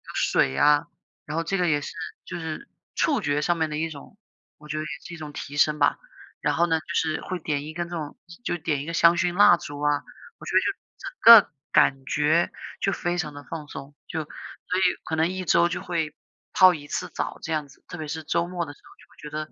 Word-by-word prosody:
水 65 Hz, -, +2 dB
呀， 145 Hz, -, +4 dB, 0.4 s
然 150 Hz, +2 st, -4 dB
后 165 Hz, -, 0 dB
这 195 Hz, +4 st, -1 dB
个 180 Hz, -1 st, +1 dB
也 145 Hz, -2 st, +2 dB
是 -, -, -7 dB, 0.3 s
就 175 Hz, -, -6 dB
是 160 Hz, -, -6 dB, 0.3 s
触 285 Hz, -7 st, +2 dB
觉 145 Hz, -4 st, 0 dB
上 175 Hz, +2 st, +1 dB
面 160 Hz, -1 st, 0 dB
的 150 Hz, -, -3 dB
一 165 Hz, +1 st, -1 dB
种， 155 Hz, +6 st, -12 dB, 0.4 s
我 150 Hz, -, -15 dB
觉 155 Hz, +1 st, -3 dB
得 155 Hz, -, -2 dB
也 155 Hz, -, -6 dB, 0.2 s
是 175 Hz, -, -8 dB
一 -, -, -7 dB
种 150 Hz, -2 st, -8 dB
提 145 Hz, 0 st, -7 dB
升 150 Hz, 0 st, +3 dB
吧。 -, -, +3 dB, 0.4 s
然 -, -, +1 dB
后 170 Hz, -, +3 dB
呢 160 Hz, -1 st, +2 dB
就 -, -, -17 dB
是 160 Hz, -2 st, 0 dB
会 185 Hz, -1 st, -4 dB
点 145 Hz, -2 st, -2 dB
一 155 Hz, -, -7 dB
根 170 Hz, +1 st, -4 dB
这 175 Hz, -, -5 dB
种 150 Hz, -3 st, -6 dB, 0.3 s
就 -, -, -1 dB
点 150 Hz, -4 st, -1 dB
一 -, -, -8 dB
个 165 Hz, -, -5 dB
香 170 Hz, +1 st, +5 dB
薰 175 Hz, 0 st, +1 dB
蜡 205 Hz, -3 st, +7 dB
烛 145 Hz, -2 st, -8 dB
啊， 145 Hz, -1 st, +1 dB, 0.4 s
我 -, -, -11 dB
觉 -, -, -3 dB
得 -, -, +8 dB
就 -, -, +1 dB, 0.3 s
整 -, -, -7 dB, 0.3 s
个 -, -, -26 dB, 0.2 s
感 135 Hz, 0 st, +3 dB
觉 150 Hz, +5 st, +2 dB, 0.3 s
就 195 Hz, -, +2 dB
非 175 Hz, 0 st, -2 dB
常 155 Hz, -4 st, -3 dB
地 145 Hz, 0 st, -10 dB
放 155 Hz, -2 st, -7 dB
松， 140 Hz, 0 st, -9 dB
就 160 Hz, -2 st, -3 dB
所 -, -, -30 dB, 0.5 s
以 -, -, 0 dB, 0.2 s
可 160 Hz, -, -2 dB
能 160 Hz, +1 st, +2 dB
1 185 Hz, 0 st, -4 dB
周 170 Hz, +1 st, +4 dB
就 175 Hz, -, -3 dB
会 160 Hz, -3 st, -2 dB, 0.4 s
泡 185 Hz, -1 st, +7 dB
1 145 Hz, -1 st, -10 dB
次 -, -, -3 dB
澡 -, -, -4 dB
这 165 Hz, -, -5 dB
样 150 Hz, -2 st, -2 dB
子。 135 Hz, -, -21 dB
特 -, -, -8 dB
别 155 Hz, -2 st, -5 dB
是 155 Hz, +2 st, -5 dB
周 170 Hz, +2 st, 0 dB
末 175 Hz, -1 st, -3 dB
的 145 Hz, -, -9 dB
时 -, -, -23 dB
候， -, -, -18 dB
就 150 Hz, -, -13 dB
会 155 Hz, +1 st, -4 dB
觉 -, -, -26 dB
155 Hz, 265 characters per minute, -25 LUFS, 150-175 Hz, 0.5 s, 得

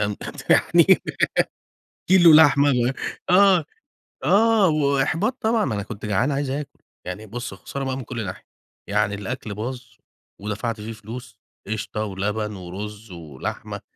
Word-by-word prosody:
تمام. 105 Hz, 0 st, -1 dB, 0.3 s
يعني -, -, +5 dB, 1.2 s
كيلو 175 Hz, -3 st, +8 dB
لحمة 145 Hz, -2 st, +6 dB
ال 125 Hz, -1 st, +2 dB, 0.4 s
آه، 190 Hz, 0 st, +6 dB
آه، 155 Hz, -, -8 dB, 1.0 s
آه، -, -, +4 dB
وإحباط 155 Hz, -, +1 dB
طبعًا، 225 Hz, 0 st, +2 dB
ما 120 Hz, -6 st, -2 dB
أنا 100 Hz, -, -3 dB
كنت 105 Hz, 0 st, -8 dB
جعان 105 Hz, +7 st, +1 dB
عايز 140 Hz, 0 st, -1 dB
آكل. 140 Hz, +2 st, -5 dB, 0.3 s
يعني 110 Hz, -, -6 dB
بُص 120 Hz, +1 st, -6 dB
خسارة 135 Hz, +7 st, -6 dB
بقي 130 Hz, -1 st, -2 dB
من 135 Hz, -, -5 dB
كل 115 Hz, -2 st, -5 dB
ناحية. 90 Hz, -, -7 dB, 0.4 s
يعني 105 Hz, 0 st, +1 dB
الأكل 105 Hz, +1 st, -5 dB
باظ، 120 Hz, +5 st, -5 dB, 0.6 s
ودفَعت 105 Hz, +2 st, -3 dB
فيه 110 Hz, +2 st, -6 dB
فلوس 110 Hz, 0 st, -10 dB, 0.3 s
قشطة 110 Hz, 0 st, -3 dB
ولبن 105 Hz, +2 st, -3 dB
ورز 100 Hz, +4 st, -8 dB
ولحمة 80 Hz, -6 st, -6 dB
115 Hz, 140 wpm, -23 LUFS, 105-140 Hz, 1.2 s, كيلو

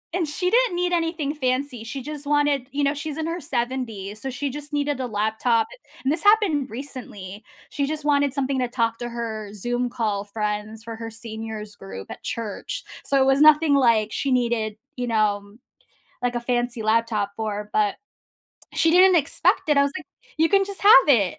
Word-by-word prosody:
and 355 Hz, -4 st, 0 dB
she 360 Hz, +5 st, -1 dB
didn't 485 Hz, -5 st, +3 dB
need 355 Hz, 0 st, 0 dB
anything 330 Hz, -4 st, 0 dB
fancy, 255 Hz, -3 st, -1 dB
she 270 Hz, +4 st, -6 dB
just 295 Hz, -1 st, -7 dB
wanted, 290 Hz, -3 st, +2 dB
you 285 Hz, +1 st, -1 dB
know, 280 Hz, 0 st, +2 dB
she's 295 Hz, +1 st, -5 dB
in 320 Hz, -, -2 dB
her 335 Hz, +2 st, -3 dB
70s, 230 Hz, -6 st, -3 dB
so 270 Hz, -, -3 dB
she 280 Hz, +3 st, -3 dB
just 295 Hz, +2 st, -8 dB
needed 290 Hz, -1 st, 0 dB
a 255 Hz, -, -2 dB
laptop, 220 Hz, +2 st, +1 dB, 0.4 s
and 270 Hz, -, +2 dB
this 325 Hz, -, -3 dB
happened 405 Hz, -10 st, +4 dB
recently. 220 Hz, -6 st, -8 dB, 0.3 s
She 280 Hz, -2 st, -1 dB
just 305 Hz, 0 st, -4 dB
wanted 285 Hz, -1 st, +3 dB
something 275 Hz, -1 st, -1 dB
to 250 Hz, -, +1 dB
talk 230 Hz, -2 st, 0 dB
to 240 Hz, 0 st, -4 dB
her 220 Hz, -3 st, -5 dB
Zoom 245 Hz, +4 st, -1 dB
call 215 Hz, -4 st, -1 dB
friends, 210 Hz, +1 st, -4 dB
for 230 Hz, 0 st, -6 dB
her 225 Hz, 0 st, -6 dB
seniors 220 Hz, -1 st, -7 dB
group 95 Hz, 0 st, -9 dB
at -, -, -9 dB
church. 230 Hz, -, -4 dB, 0.2 s
So, 275 Hz, -, +2 dB
it -, -, +4 dB
was 270 Hz, +1 st, +4 dB
nothing, 305 Hz, 0 st, +6 dB
like, 230 Hz, -5 st, +3 dB
she 275 Hz, -, -1 dB
needed, 235 Hz, -4 st, 0 dB, 0.2 s
you 250 Hz, 0 st, -2 dB
know, 210 Hz, -2 st, 0 dB, 0.7 s
like, 245 Hz, 0 st, 0 dB
a 240 Hz, -, -1 dB
fancy 240 Hz, -1 st, -1 dB
laptop 220 Hz, -2 st, +1 dB
for, 210 Hz, -1 st, -3 dB
but. 210 Hz, -2 st, +2 dB, 0.8 s
She 325 Hz, -, +3 dB
didn't 370 Hz, +1 st, +7 dB
expect 310 Hz, +1 st, +1 dB
it, 295 Hz, -, +4 dB
I -, -, +6 dB
was 280 Hz, -, +1 dB
like, 315 Hz, -, -12 dB, 0.3 s
"You 325 Hz, -, +4 dB
can 390 Hz, +1 st, +4 dB
just 395 Hz, 0 st, -7 dB
have 400 Hz, -9 st, +8 dB
it." 210 Hz, -10 st, +4 dB
250 Hz, 195 wpm, -24 LUFS, 220-290 Hz, 0.8 s, have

